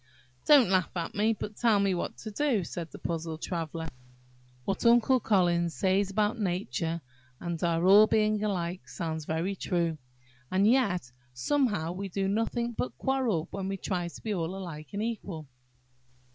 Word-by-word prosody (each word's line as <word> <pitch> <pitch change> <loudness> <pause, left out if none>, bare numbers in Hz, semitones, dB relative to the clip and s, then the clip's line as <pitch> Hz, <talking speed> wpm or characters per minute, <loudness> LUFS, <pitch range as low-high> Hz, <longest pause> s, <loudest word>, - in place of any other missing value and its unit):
"Don't 275 -10 +7
laugh 185 -2 +3
at 165 -1 -3
me, 215 +2 +2
but 210 -1 -6
tell 225 -4 +4
me 200 -1 +2
what 175 - -3
to 215 - -7
do," 235 -3 +1
said 165 0 -6
the - - -10
puzzled 165 -1 -4
Traveller. 165 -2 -3 0.8
"What 195 - -2
Uncle 240 +2 +5
Collins 175 -6 +2
says 195 +1 +2
about 210 +4 0
nature 170 - -1 0.4
and 170 -1 -4
our 170 0 +2
all 205 +3 +8
being 215 -1 +2
alike, 180 -3 -2
sounds 160 -3 -4
very 165 +6 -1
true, 170 -4 -1 0.5
and 190 +2 +2
yet 200 - +2 0.2
somehow 205 - +1
we 195 +2 -5
do 195 +1 -1
nothing 230 +3 0
but 125 - -4
quarrel 240 -11 0
when 195 -1 -4
we 195 0 -2
try 180 -2 -2
to 170 - -10
be 215 - -1
all 175 -1 -2
alike 165 -6 -7
and 205 +2 -2
equal." 200 -8 -4
190 Hz, 165 wpm, -29 LUFS, 170-215 Hz, 0.8 s, all